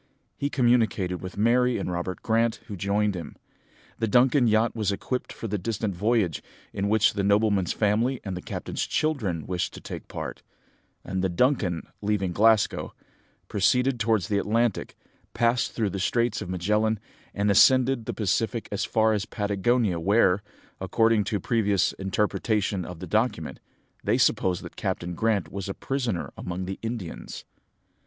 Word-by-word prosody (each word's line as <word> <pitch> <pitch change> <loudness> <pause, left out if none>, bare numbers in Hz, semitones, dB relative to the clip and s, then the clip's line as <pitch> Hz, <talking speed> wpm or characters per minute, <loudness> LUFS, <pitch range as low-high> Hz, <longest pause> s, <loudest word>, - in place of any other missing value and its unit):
He 140 - -2
communicated 115 -8 +2
with 95 +1 -8
Mary 120 +3 +3
and - - -3
Robert 90 +1 -4
Grant, 115 0 +2
who 105 - -7
joined 100 +2 0
him. 85 -5 -7 0.6
The 115 - +1
Duncan 125 +3 +4
yacht 110 +1 +2
was 105 -3 0
equipped 125 +5 -3
for 115 - -6
the 105 -1 -2
distant 105 0 -2
voyage, 105 -4 +1 0.3
in 100 +1 -1
which 110 0 +4
the 100 -1 -1
nobleman's 100 -2 +2
family 115 +5 +1
and 95 -3 -4
the 90 - -5
captain's - - -4
children 110 - -1
wished 90 -1 -2
to - - -8
take - - -8
part; - - -6 0.6
and 95 0 -3
the 95 - +2
Duncan, 95 - +1 0.2
leaving 100 -3 0
Glasgow, 110 +2 +2 0.5
proceeded 125 +5 +2
towards 110 -4 +1
the 100 -1 +1
Atlantic, 115 +1 0 0.4
passed 120 +1 +1
through 105 -4 -1
the 95 - -4
Straits 115 +3 0
of - - -6
Magellan, 105 +4 +1 0.4
and 100 0 +2
ascended 130 +3 +5
the - - -3
Pacific 115 +2 -1
as 100 - -1
far 110 0 +2
as 105 -1 -1
Patagonia, 100 -1 0
where, 95 +1 +3 0.4
according 110 +2 +2
to 105 - -2
a - - 0
previous 105 -2 +1
interpretation 100 0 -1
of 90 -2 -9
the - - -6
document, 110 -8 -1 0.4
they - - +2
supposed 90 -2 +2
that - - -10
Captain 85 +1 -3
Grant 100 -4 0
was 100 0 -5
a 100 - -4
prisoner 125 -10 -2
among 90 +1 -5
the 95 +1 -5
Indians. 115 -7 -6
105 Hz, 160 wpm, -26 LUFS, 95-115 Hz, 0.6 s, ascended